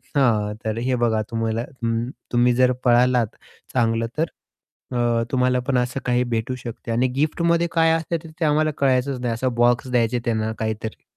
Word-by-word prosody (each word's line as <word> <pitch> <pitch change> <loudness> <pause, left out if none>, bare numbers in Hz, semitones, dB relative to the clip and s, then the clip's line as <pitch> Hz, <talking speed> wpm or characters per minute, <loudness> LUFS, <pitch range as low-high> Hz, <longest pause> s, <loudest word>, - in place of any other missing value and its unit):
हां, 110 -6 +2
तर 110 +1 -1
हे 125 +2 0
बघा 115 -2 +1
तुम्हाला 115 0 -1 0.2
हं. 115 +1 0 0.2
तुम्ही 120 0 +4
जर 125 0 +4
पळालात 120 -2 +3 0.4
चांगलं, 115 -2 +1
तर 160 - +2 0.7
अ, - - -1 0.3
तुम्हाला 125 -1 +2
पण 130 -2 +2
असं 125 +2 -1
काही 125 0 +2
भेटू 120 +2 -1
शकते. 115 -1 -7
आणि 120 +3 +2
गिफ्टमध्ये 170 +3 +1
काय 165 -1 +3
असते 165 +1 -1
ते 160 +1 -3
आम्हाला 155 +1 +2
कळायचच 130 -1 +1
नाही 120 -2 -1
असा 125 +3 -2
बॉक्स 120 +1 +3
द्यायचे 120 0 +2
त्यांना 110 -2 0
काहीतरी. 110 0 -4
125 Hz, 165 wpm, -22 LUFS, 115-135 Hz, 0.7 s, तुम्ही